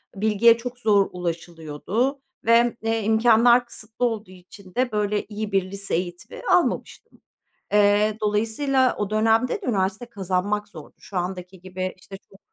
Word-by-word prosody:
Bilgiye 220 +3 +4
çok 245 +1 -7
zor 205 -4 +3
ulaşılıyordu 175 - -3 0.2
ve, 230 0 +4
eee, 225 0 -1
imkânlar 235 +3 +4
kısıtlı 225 +1 -5
olduğu 220 -4 -3
için 185 +1 -15
de 250 -1 +1
böyle 210 -1 -1
iyi 215 0 -5
bir 190 -1 0
lise 200 0 -3
eğitimi 175 0 -5
almamıştım. - - 0 0.5
Eee, 210 +1 +3
dolayısıyla 225 +6 +1
o 205 -1 -2
dönemde 225 - +2
de - - -6
üniversite 200 +1 -1
kazanmak 205 -1 -2
zordu. 160 -7 -12
Şu 195 - -10
andaki 180 0 -4
gibi, 185 0 -5
işte, 195 +1 -11
çok 195 0 -21
210 Hz, 145 wpm, -23 LUFS, 185-225 Hz, 0.5 s, Bilgiye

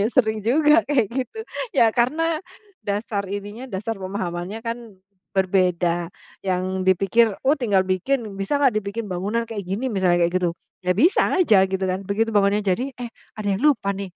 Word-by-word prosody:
ya - - +3
s - - -28
sering 220 -3 +2
juga 300 +8 +4
kayak 255 -7 +3
gitu. 260 - -3 0.3
Ya 230 - +4
karena 310 +7 +1 0.4
dasar 205 0 -2
ininya, 205 +6 -6
dasar 215 +3 -3
pemahamannya 185 +1 -4
kan 230 +1 -2 0.6
berbeda, 180 -3 +1 0.3
yang 185 0 -1
dipikir, 195 +5 +4 0.2
"Oh 280 - +5
tinggal 205 -7 +2
bikin, 215 +8 0 0.2
bisa 195 +9 0
enggak 265 -5 +4
dibikin 215 +2 -5
bangunan 200 +6 -1
kayak 220 -3 -5
gini?" 195 +7 -3
Misalnya, 185 -7 +2
kayak 175 - -5
gitu. 175 - +2 0.3
Ya 180 - -1
bisa 310 - +4 0.2
aja 220 - +5
gitu 190 0 -2
kan, 185 +1 -2
begitu 220 +3 0
bangunan 200 0 +3
jadi, 235 +9 0
"Eh 245 - -4 0.3
ada 215 - -4
yang - - -7
lupa 285 -9 +3
nih," 195 -1 -6
205 Hz, 175 wpm, -23 LUFS, 190-240 Hz, 0.6 s, Oh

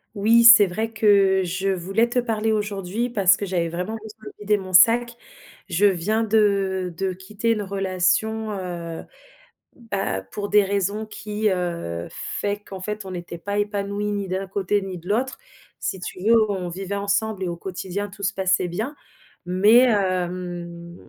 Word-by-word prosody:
Oui 225 +3 +4
c'est 230 -3 +10
vrai 220 +5 -3
que 200 -3 +4
je 190 +3 -2
voulais 195 +5 +1
te 245 - -3
parler 225 -2 0
aujourd'hui, 205 +2 -2
parce 195 -3 +4
que 205 - -3
j'avais 175 -3 -1
vraiment 180 +6 -4
besoin 220 0 -12
de - - -8
vider 210 0 +1
mon 190 -2 -8
sac. 235 +5 +5 0.5
Je 180 +4 +2
viens 205 +4 +2
de 200 -4 +1
de 190 0 -1
quitter 205 +5 -3
une 215 -2 0
relation, 195 +3 0
heu, 175 -4 -5 0.7
bah, 195 - -3
pour 205 -1 -4
des 210 0 +5
raisons 200 +2 -1
qui, 215 0 -3
heu, 170 - -3
fait 205 0 -3
qu'en 200 -2 -10
fait 210 +1 -5
on 190 - -6
était 175 -1 -7
pas 205 +4 -3
épanouis 205 0 -2
ni 200 -1 -3
d'un 190 +1 -3
côté 200 +1 0
ni 190 -2 -6
de 170 +1 -13
l'autre. 250 +5 0 0.4
Si 190 - -4
tu 180 +1 -7
veux, 220 0 +4
on 185 -3 -3
vivait 190 +3 -5
ensemble 200 0 -1
et - - -1
au 175 - -3
quotidien 190 +3 -5
tout 200 0 -12
se 200 +3 0
passait 190 -2 +1
bien. 220 - -4 0.5
Mais, 200 +6 +5
hem, 175 -3 -2
200 Hz, 170 wpm, -23 LUFS, 185-215 Hz, 0.7 s, c'est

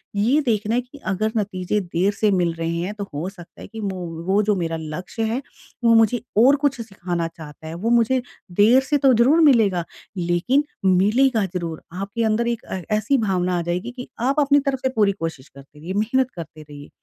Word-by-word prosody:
ये 240 +9 +3
देखना 220 -1 0
है 245 - +2
कि 255 +4 -15
अगर 215 +3 0
नतीजे 200 -1 -1
देर 180 +2 0
से 210 +1 +1
मिल 180 -3 +2
रहे 165 0 -3
हैं 180 +5 -3
तो 205 - -5
हो 155 +6 -3
सकता 175 -4 -14
है - - -9
कि 220 +2 -8
मो 195 -2 -3 0.3
वो 195 +2 +3
जो 210 0 +2
मेरा 165 -3 -2
लक्ष्य 175 +8 -5
है 230 +4 -1 0.4
वो 230 -1 +5
मुझे 225 +1 +3 0.2
और 260 +5 +6
कुछ 275 -4 +1
सिखाना 175 -6 -3
चाहता 160 -1 -11
है। 160 - -6
वो 205 +7 -2
मुझे, 240 +2 +3 0.3
देर 215 +8 +5
से 290 +2 +1
तो 270 -2 +4
ज़रूर 250 +8 +4
मिलेगा 220 - +4 0.3
लेकिन 175 +11 +1 0.2
मिलेगा 210 +5 +3
ज़रूर। 170 -3 -4 0.2
आपके 200 +4 -3
अंदर 225 +2 +1
एक 235 -1 -1
ए 185 -1 -4
ऐसी 215 +6 +1
भावना 185 -5 0
आ - - -1
जाएगी 180 +7 -3
कि 250 - -7
आप 270 +5 +1
अपनी 285 0 +4
तरफ 275 -1 -2
से 260 - 0
पूरी 205 -2 +4
कोशिश 165 -7 -6
करते 140 +2 -16
रहिए, 170 +5 -5
मेहनत 240 +5 +1
करते 160 -2 -9
रहिए। 145 -1 -12
205 Hz, 210 wpm, -22 LUFS, 175-235 Hz, 0.4 s, और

